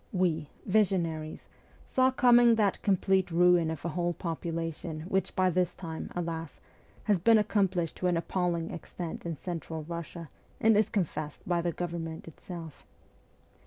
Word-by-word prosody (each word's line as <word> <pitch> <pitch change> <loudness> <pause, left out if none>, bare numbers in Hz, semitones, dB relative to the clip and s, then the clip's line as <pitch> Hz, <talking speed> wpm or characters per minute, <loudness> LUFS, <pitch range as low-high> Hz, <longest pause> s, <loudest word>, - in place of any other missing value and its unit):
We, 165 -6 0
' - - -29
visionaries, 175 -6 0 0.4
saw 260 0 +3
coming 240 -2 +6
that 210 -3 +1
complete 190 -1 +2
ruin 175 -1 +4
of 160 -1 -5
a - - 0
whole 175 +1 -1
population 165 -1 -4
which 190 +3 -1
by 185 -1 +3
this 180 0 0
time, 165 -3 -6
alas, 165 -2 -4 0.4
has 205 -4 +2
been 225 +6 +6
accomplished 190 -5 +1
to 180 - 0
an 175 -1 +2
appalling 170 -1 -1
extent 170 0 -6
in 165 - -2
Central 165 -1 -5
Eussia, 170 0 -7 0.3
and 225 0 +5
is 210 0 +3
confessed 160 -8 -3
by 175 -1 +2
the 170 0 0
government 165 -1 -5
itself. 165 -1 -9
175 Hz, 150 wpm, -30 LUFS, 165-190 Hz, 0.4 s, coming